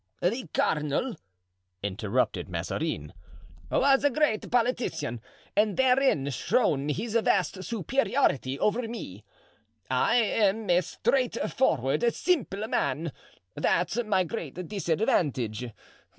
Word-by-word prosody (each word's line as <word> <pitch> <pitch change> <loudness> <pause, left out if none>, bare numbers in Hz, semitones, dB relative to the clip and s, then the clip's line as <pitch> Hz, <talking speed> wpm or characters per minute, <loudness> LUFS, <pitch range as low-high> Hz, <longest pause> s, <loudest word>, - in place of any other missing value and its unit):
"The 220 +2 -1
cardinal," 150 - 0 0.7
interrupted 100 +1 -1
Mazarin, 75 +4 -3 0.6
"was 270 0 +3
a 285 - +5
great 265 -6 0
politician 235 - 0 0.3
and 210 -1 +2
therein 260 - +3
shone 145 - +1
his 210 +9 -2
vast 190 -2 +1
superiority 225 - 0
over 225 +7 0
me. 110 - -7 0.7
I 130 - +3
am 215 -3 +2
a 175 +1 +5
straightforward, 230 - 0
simple 220 - 0
man; 160 -4 -1 0.4
that's 180 - +1
my 195 -4 +2
great 175 - -6
disadvantage. 150 - 0
200 Hz, 95 wpm, -28 LUFS, 145-240 Hz, 0.7 s, a